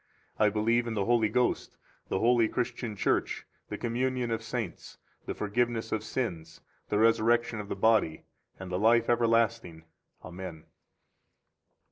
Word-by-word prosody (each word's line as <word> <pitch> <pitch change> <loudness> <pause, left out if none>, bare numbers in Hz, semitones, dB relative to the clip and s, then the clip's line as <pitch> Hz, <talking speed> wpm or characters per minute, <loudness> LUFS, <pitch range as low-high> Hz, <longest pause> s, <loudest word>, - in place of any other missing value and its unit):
I 105 - +5
believe 115 +3 +1
in 115 - -3
the 100 -2 0
Holy 115 -2 +3
Ghost, 125 +2 0 0.3
the - - 0
holy 115 +2 +4
Christian 120 -2 -3
Church, - - 0 0.2
the - - -4
communion 125 0 -1
of 115 - -1
saints, - - -5 0.3
the - - -3
forgiveness 115 +2 -1
of 110 -1 -1
sins, 85 -10 -4 0.3
the 105 - +1
resurrection 115 +1 +3
of 105 -1 -7
the - - -2
body, 110 -8 +2 0.4
and 95 -1 -7
the 90 - -1
life 115 +2 +4
everlasting. 115 -7 +1 0.4
Amen. 85 -3 -8
115 Hz, 140 wpm, -29 LUFS, 105-120 Hz, 0.4 s, I